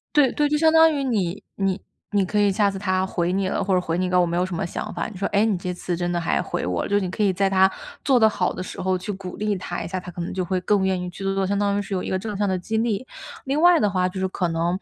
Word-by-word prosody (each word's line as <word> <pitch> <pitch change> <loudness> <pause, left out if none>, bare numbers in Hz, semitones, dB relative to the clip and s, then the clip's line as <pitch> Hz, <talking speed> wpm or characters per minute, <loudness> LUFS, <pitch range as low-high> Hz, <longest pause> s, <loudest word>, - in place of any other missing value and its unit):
对 280 -4 +5
对， 295 0 +1
就 300 - +1
相 320 +1 +4
当 320 0 +6
于 280 - -1
你 205 -8 -1
你 195 0 -1 0.3
你 200 -2 +3
可 210 +3 -1
以 205 -1 +4
下 200 0 +2
次 195 - -6
他 185 -1 0
回 180 -1 -1
你 190 0 0
了， - - -1
或 190 -1 +1
者 180 - +3
回 165 0 -2
你 185 - +1
一 - - -2
个 180 - -2
“我 - - +3
没 170 0 -2
有 180 +1 +1
什 185 - -5
么 - - -2
想 - - -5
法”， - - -3
你 - - -11
说： 195 - -1
“哎， 205 +2 +4
你 205 -5 +1
这 180 0 -4
次 175 -1 -3
真 175 0 -1
的 175 - 0
还 165 - +1
回 - - -3
我 90 -1 -1
了。” - - -4
就 205 - -1
是 - - +3
你 180 - -3
可 215 - -8
以 200 -2 +4
在 195 +1 +1
他 190 0 +5 0.4
做 265 -3 +4
得 220 - +7
好 185 -4 0
的 185 - -5
时 - - -7
候 185 0 +1
去 185 +3 -5
鼓 190 -2 -6
励 210 -1 -1
他 175 -1 -5
一 165 - -5
下， 185 +1 -3
他 180 0 -8
可 175 - -7
能 170 - -3
就 185 -1 -2
会 185 +1 -1
更 200 0 +2
愿 190 -1 +1
意 180 - -4
去 195 - -8
做 195 0 0
做， 195 0 0
相 200 +1 0
当 200 -1 +1
于 205 - 0
是 200 - -5
有 185 - 0
一 - - -5
个 190 - 0
正 210 +1 -4
向 205 0 0
的 185 - +1
激 215 +5 -3
励。 225 +1 0 0.4
另 280 +3 0
外 350 -2 +6
的 205 - +2
话， 185 -1 +1
就 190 +1 -6
是 190 - 0
可 185 -1 -1
能 170 +2 0
190 Hz, 375 characters per minute, -23 LUFS, 180-205 Hz, 0.4 s, 得